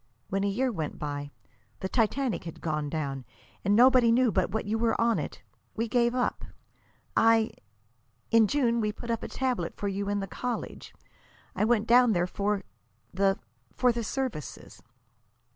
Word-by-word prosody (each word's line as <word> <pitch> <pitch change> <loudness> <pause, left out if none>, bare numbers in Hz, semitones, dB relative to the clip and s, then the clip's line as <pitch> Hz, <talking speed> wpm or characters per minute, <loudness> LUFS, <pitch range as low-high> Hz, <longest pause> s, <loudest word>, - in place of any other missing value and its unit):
When 195 +1 0
a - - +2
year 250 +6 0
went 160 -8 -4
by 145 -1 -4 0.5
the 190 - -1
Titanic 240 +1 0
had 165 - -8
gone 150 -2 -2
down, 140 -4 -3 0.4
and 200 +2 +3
nobody 250 0 +6
knew 245 0 +4
but 185 -1 +1
what 220 - -2
you 220 +2 -1
were 230 -1 +1
on 230 0 +3
it - - -6 0.3
we 230 +1 -1
gave 240 +1 +2
up. 250 - -1 0.7
I 225 0 +4 0.8
in 230 -1 +6
June 235 -3 +1
we 210 -1 0
put 235 +3 -6
up 230 - -1
a - - -5
tablet 250 -10 -2
for 205 - -2
you 200 0 -2
at 205 0 0
the 195 - -2
college. 245 +5 -5 0.6
I 210 - +2
went 225 -1 +2
down 240 -2 +5
for 200 +2 -1 0.5
the 195 +1 +2 0.4
for 250 - +3
the 235 0 -3
services." 230 - -5
220 Hz, 165 wpm, -28 LUFS, 195-240 Hz, 0.8 s, nobody